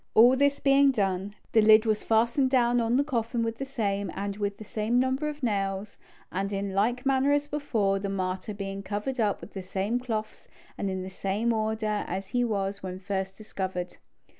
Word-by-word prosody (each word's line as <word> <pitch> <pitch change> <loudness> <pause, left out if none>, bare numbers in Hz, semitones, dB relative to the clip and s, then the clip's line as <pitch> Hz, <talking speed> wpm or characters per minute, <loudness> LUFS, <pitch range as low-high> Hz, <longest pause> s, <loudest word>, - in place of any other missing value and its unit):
All 240 +4 +8
this 280 +1 +2
being 275 0 +5
done, 200 -4 -1 0.2
the 220 - +5
lid 215 +1 +7
was 215 -1 +1
fastened 235 +4 +2
down 245 -2 +3
on 230 +2 +2
the 280 - +3
coffin 235 -4 -1
with 225 0 -3
the 270 - -3
same, 200 -7 -1
and 200 +1 -3
with 205 -1 -2
the - - -9
same 220 +3 0
number 260 +4 +1
of 300 -1 -8
nails, 200 -2 -2 0.3
and 195 +2 -2
in 200 -1 -2
like 240 +6 +1
manner 270 +1 +3
as 290 0 +2
before, 225 -10 0
the 200 0 -3
martyr 190 +1 -3
being 195 -1 -5
covered 210 +6 -3
up 210 -3 +1
with - - -11
the 195 - -5
same 195 +6 -1
cloths 220 -4 -4 0.3
and 200 - -2
in 190 -1 -3
the 190 - -7
same 205 +5 0
order 215 -1 -1
as 190 0 -4
he 245 0 +1
was 200 -3 -1
when 185 -1 -5
first 190 0 -3
discovered. 190 -4 -4
215 Hz, 200 wpm, -28 LUFS, 195-245 Hz, 0.3 s, All